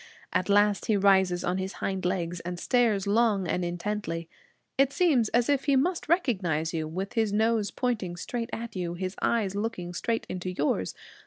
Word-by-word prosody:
At 185 - 0
last 205 0 +3
he 215 - +3
rises 190 -2 +3
on 180 +1 0
his 190 +1 -3
hind 190 -2 -3
legs, 175 -1 -1
and 175 +1 -5
stares 230 -5 +2
long 205 -2 +2
and 180 - 0
intently. 175 -1 -3 0.5
It 275 0 +3
seems 280 -10 +3
as 240 0 +2
if 285 -2 +1
he 280 -2 +3
must 325 +5 0
recognize 185 - +1
you, 160 -1 -2
with 190 +7 -4
his 220 -3 +1
nose 220 0 +2
pointing 215 -9 -2
straight 230 +6 -4
at 235 -1 -5
you, 175 -2 -3
his 185 +1 -4
eyes 215 -5 +1
looking 200 -5 -3
straight 225 +5 -1
into 185 0 -4
yours. 145 - -1
200 Hz, 180 wpm, -28 LUFS, 180-230 Hz, 0.5 s, last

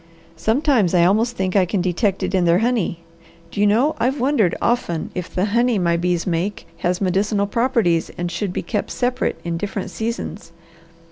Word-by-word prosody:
Sometimes 220 - +2
I 170 -1 +5
almost 225 +6 +2
think 190 0 -1
I 195 - +5
can 195 +3 -1
detect 185 +2 0
it - - -2
in 185 -2 +2
their 170 0 +4
honey. 225 -6 0 0.5
Do 205 - -2
you 205 - +5
know 245 +9 +3
I've 265 +4 0
wondered 240 - +2
often 205 -9 -1
if 180 -1 -5
the 185 - 0
honey 235 +2 +2
my 170 -2 +2
bees 175 0 0
make 180 +3 -2
has 180 +2 -1
medicinal 200 +2 +1
properties 220 -7 +1
and 175 0 -3
should 180 +2 -2
be - - -3
kept 205 +4 -2
separate 250 +1 -1
in 170 -1 -2
different 200 +1 -4
seasons. 220 -6 -5
200 Hz, 185 wpm, -21 LUFS, 175-230 Hz, 0.5 s, I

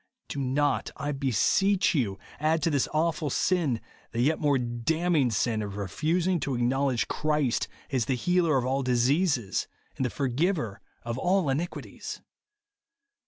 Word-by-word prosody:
Do 140 - -4
not, 140 +2 +1
I 145 - -2
beseech 145 - +2
you, 110 - 0 0.2
add 155 +1 +1
to 165 - +2
this 140 -3 +2
awful 155 -1 0
sin, 150 -5 +1 0.3
the 115 - -2
yet 145 +6 +2
more 145 -2 +3
damning 135 +5 +1
sin 110 0 0
of 100 -1 -5
refusing 165 - 0
to 135 -2 -2
ac 120 - 0
knowledge 130 -2 +1
Christ 150 -5 0 0.2
as 130 -4 +1
the 130 - 0
healer 170 +2 +2
of 125 - 0
all 135 +2 +1
dis 125 0 +2
eases, 140 - +1 0.3
and - - -1
the 125 - +1
forgiver 135 - -1 0.2
of 120 +1 -3
all 180 -2 +2
iniquities. 160 +6 -4
140 Hz, 155 wpm, -28 LUFS, 120-160 Hz, 0.3 s, more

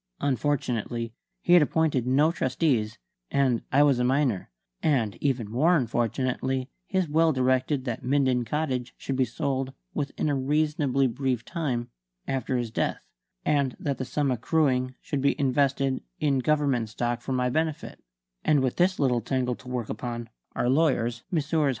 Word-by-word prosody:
Unfortunately, 125 -4 -1 0.3
he 175 - +4
had 175 - +8
appointed 150 -5 +1
no 145 +5 +4
trustees, 130 -7 0 0.3
and 130 -4 +2
I 140 +2 +5
was 140 -4 +3
a - - +2
minor; 130 -5 +1 0.3
and 120 - +1
even 130 -6 0
more 155 +10 +4
unfortunately 130 +2 -1 0.2
his 190 -3 0
will 160 +2 +3
directed 130 +1 +1
that 120 -3 -3
Minden 130 -1 +2
Cottage 130 -1 -2
should 135 - -3
be 130 0 +2
sold 135 +1 -2 0.2
"within 145 +1 -2
a 145 - +1
reasonably 145 -1 +1
brief 130 -1 -1
time" 135 -9 -2 0.4
after 130 -1 -1
his 120 -2 -3
death, - - -2 0.4
and 140 -4 +1
that 140 -3 -2
the - - -1
sum 135 +2 0
accruing 130 0 +1
should 140 - -3
be 140 +3 +1
invested 135 -1 +1 0.2
in 140 -3 +2
Government 135 -5 +1
stock 120 +2 -2
for 135 - -3
my 125 -1 +1
benefit; 160 +1 -2 0.4
and 150 -3 +3
with 130 -2 -1
this 185 +1 +3
little 125 -4 +2
tangle 125 +1 -1
to 125 - -12
work 125 -3 -3
upon, 120 +1 -5 0.3
our - - 0
lawyers 125 -5 +2
Messrs. 155 -2 +1
130 Hz, 155 wpm, -27 LUFS, 125-145 Hz, 0.4 s, had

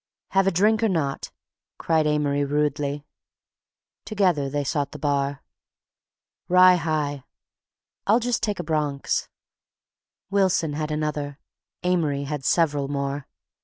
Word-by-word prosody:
"Have 195 0 +2
a - - +4
drink 210 +5 +3
or 225 - +3
not?" 155 -7 -2 0.5
cried 160 -2 +1
Amory 145 -1 +1
rudely. 145 0 -1 1.0
Together 180 -10 +1
they 145 +1 -1
sought 145 0 -2
the - - -6
bar. 140 -1 -1 1.0
"Rye 180 0 +7
high." 150 -4 -2 0.8
"I'll 220 +4 +5
just 245 -1 -1
take 210 -3 -1
a - - -2
Bronx." 150 -3 -1 1.0
Wilson 190 -6 +2
had 155 +1 -3
another; 150 -2 -3 0.5
Amory 160 -6 +1
had 145 -1 -4
several 145 -3 +2
more. 140 0 -3
150 Hz, 120 wpm, -24 LUFS, 145-180 Hz, 1.0 s, Rye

